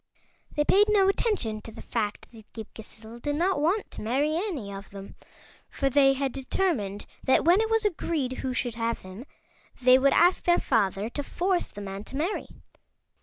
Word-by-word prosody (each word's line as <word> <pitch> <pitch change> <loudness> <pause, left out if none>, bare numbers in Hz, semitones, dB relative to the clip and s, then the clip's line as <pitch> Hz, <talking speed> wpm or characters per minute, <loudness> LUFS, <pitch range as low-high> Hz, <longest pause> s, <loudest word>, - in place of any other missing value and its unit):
They 295 - +1
paid 415 +5 +4
no 400 -2 +4
attention 390 - 0
to 225 - -10
the - - -12
fact 210 -3 -3
that 225 -2 -16
Ghip 220 -2 -6
Ghisizzle 220 +1 -12
did 290 +2 -1
not 345 -1 +1
want 370 +7 0
to - - -6
marry 275 +8 0
any 325 - -3
of 195 0 -9
them, 195 0 -10 0.6
for 275 -1 -1
they 270 0 +5
had 270 0 -1
determined 260 - -2 0.2
that 260 - +3
when 355 +5 +5
it 445 - -1
was 450 -1 +2
agreed 310 -9 -1
who 260 - -2
should 250 -1 -2
have 230 0 -2
him 185 +7 -10 0.5
they 255 +1 +6
would 275 +1 +4
ask 355 +2 +4
their 345 0 +3
father 200 -4 0
to 290 - -3
force 360 +5 -1
the 205 - -10
man 195 0 -6
to - - -9
marry. 330 +9 -2
270 Hz, 190 wpm, -27 LUFS, 220-345 Hz, 0.6 s, they